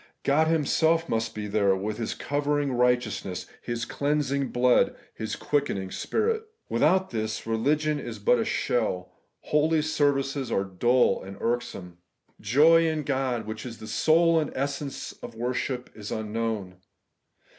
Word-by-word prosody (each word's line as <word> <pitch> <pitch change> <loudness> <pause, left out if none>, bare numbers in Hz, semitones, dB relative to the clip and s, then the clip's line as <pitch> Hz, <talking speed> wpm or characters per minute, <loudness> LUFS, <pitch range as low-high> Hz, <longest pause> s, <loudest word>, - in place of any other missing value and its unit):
God 155 +3 +3
Himself 165 +1 +2
must 115 -3 -1
be 105 -1 -4
there, 100 -2 +2
with 105 +3 -3
His 115 - -2
covering 145 -1 0
righteousness. 120 -6 0 0.2
His 120 0 -3
cleansing 140 0 0
blood, 125 0 +3 0.2
His 110 - -4
quickening 100 -10 -1
Spirit. 445 0 0 0.3
"Without 190 0 +2
this, 110 -1 -3
religion 145 +7 +1
is 120 -5 -6
but 105 +4 +3
a - - +2
shell; 95 -8 -1 0.3
holy 155 +1 +2
services 140 -3 0
are 95 - +1
dull 110 +5 +2
and 95 +1 -9
irksome. 95 -7 -3 0.4
Joy 155 +10 +5
in 155 -1 -1
God, 130 -5 -1
which 110 0 -6
is 120 -3 -7
the - - -10
soul 165 +6 +3
and 150 - -2
essence 140 +1 -3
of 115 - -8
worship, 125 +1 -3
is 105 -1 -8
unknown. 110 -3 -3
125 Hz, 140 wpm, -27 LUFS, 110-150 Hz, 0.4 s, Joy